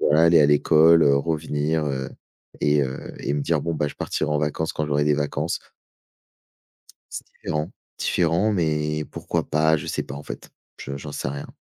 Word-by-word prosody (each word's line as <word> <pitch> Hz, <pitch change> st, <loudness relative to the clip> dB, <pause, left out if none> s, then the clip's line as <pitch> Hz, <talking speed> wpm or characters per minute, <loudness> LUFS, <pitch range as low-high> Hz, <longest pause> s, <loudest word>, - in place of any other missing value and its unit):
voilà, 75 Hz, +2 st, +4 dB
aller 85 Hz, -1 st, +6 dB
à 70 Hz, -, +6 dB
l'école, 80 Hz, +3 st, +5 dB
heu, 70 Hz, -1 st, +5 dB
revenir», 75 Hz, 0 st, -1 dB
heu 65 Hz, -1 st, -2 dB, 0.5 s
et 75 Hz, 0 st, +3 dB
heu 65 Hz, 0 st, -5 dB
et 70 Hz, -, -2 dB
me 75 Hz, -, -1 dB
dire: 80 Hz, -2 st, +1 dB
«Bon 85 Hz, -, -2 dB
bah, 75 Hz, -1 st, 0 dB
je -, -, -10 dB
partirai 75 Hz, -, -2 dB
en 75 Hz, -, +1 dB
vacances 75 Hz, +2 st, -1 dB
quand 75 Hz, -, -2 dB
j'aurai 75 Hz, 0 st, +1 dB
des 75 Hz, -1 st, +3 dB
vacances». 75 Hz, -1 st, -2 dB, 1.5 s
C'est -, -, -6 dB
différent. 75 Hz, +1 st, -4 dB, 0.3 s
Différent, 90 Hz, +5 st, +1 dB
mais 75 Hz, -4 st, 0 dB
pourquoi -, -, -3 dB
pas? 80 Hz, +1 st, +3 dB
Je -, -, -7 dB
sais -, -, -2 dB
pas, 70 Hz, -, -8 dB
en 75 Hz, -, -8 dB
fait. -, -, -8 dB, 0.3 s
Je 70 Hz, +1 st, -6 dB
j'en 75 Hz, +1 st, -8 dB
sais 65 Hz, -, -4 dB
rien. 70 Hz, +1 st, -5 dB
75 Hz, 190 wpm, -23 LUFS, 75-80 Hz, 1.5 s, aller